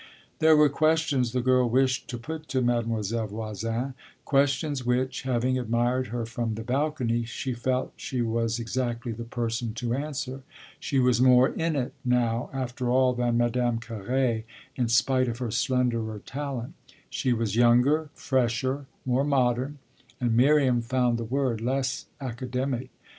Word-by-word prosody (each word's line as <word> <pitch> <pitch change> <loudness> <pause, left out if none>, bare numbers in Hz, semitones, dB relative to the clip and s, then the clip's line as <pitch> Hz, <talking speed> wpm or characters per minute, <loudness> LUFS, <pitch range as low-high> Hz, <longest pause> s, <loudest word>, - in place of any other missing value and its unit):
There 160 0 +6
were 150 0 +7
questions 150 -4 +1
the 125 0 -1
girl 130 -1 +3
wished 130 +1 +1
to 120 - -5
put 155 +6 -7
to 130 -1 0
Mademoiselle 115 -2 0
Voisin 115 +4 -3 0.3
questions 140 0 +1
which, 125 +1 0
having 130 0 0
admired 120 +2 0
her 115 +1 -3
from 115 -1 -3
the 110 - -5
balcony, 125 -2 0
she 120 +3 -4
felt 125 +2 -1
she 130 - -4
was 115 0 0
exactly 120 0 -2
the 115 +1 -5
person 115 -1 -3
to 120 0 -2
answer. 140 -1 -4 0.4
She 140 - -2
was 125 -2 +3
more 125 0 +6
"in 165 -1 -1
it" 130 -2 -2
now, 120 -2 +1
after 130 -1 -3
all, 130 0 +4
than 120 -1 0
Madame 120 0 +1
Carré, 115 +1 -1 0.3
in 125 -2 0
spite 130 +2 +3
of 115 -1 -3
her 120 -3 -3
slenderer 115 -3 0
talent: 135 -3 -5 0.3
she 130 - -1
was 115 -3 0
younger, 125 +6 +4
fresher, 130 0 0 0.2
more 130 +1 +2
modern 130 0 +1 0.4
and 120 -3 +1
Miriam 130 -1 +4
found 120 0 +1
the 115 - -3
word 125 -2 -1
less 130 +2 -1
academic. 130 0 -3
125 Hz, 150 wpm, -27 LUFS, 115-130 Hz, 0.4 s, were